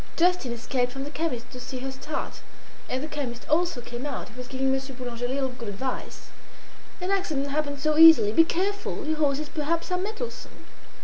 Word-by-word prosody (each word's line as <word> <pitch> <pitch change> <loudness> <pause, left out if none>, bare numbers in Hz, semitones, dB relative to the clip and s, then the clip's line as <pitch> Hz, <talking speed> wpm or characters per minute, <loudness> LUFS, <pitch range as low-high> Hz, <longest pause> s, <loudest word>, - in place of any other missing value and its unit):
Justin 355 -7 +3
escaped 245 +1 -1
from 270 +1 -5
the 290 - -6
chemist's 305 -7 -3
to 250 - -7
see 255 +1 -6
her 265 +1 -4
start, 265 +4 -5 0.5
and 260 +2 -1
the - - -3
chemist 260 -6 -5
also 325 -5 +2
came 240 +1 -6
out. 280 - -4
He 225 - -16
was 250 0 -7
giving 265 0 0
Monsieur 270 0 -2
Boulanger 245 -1 -4
a - - +1
little 265 +1 0
good 240 -3 -6
advice. 255 +6 -5 0.7
"An 365 +1 -2
accident 315 -8 0
happens 285 -1 -1
so 310 -1 +3
easily. 320 -10 +9
Be 325 - +7
careful! 385 +2 -1
Your 315 0 0
horses 295 0 +1
perhaps 330 +4 -1
are 360 - +1
mettlesome." 435 +5 -5
275 Hz, 195 wpm, -27 LUFS, 250-325 Hz, 0.7 s, easily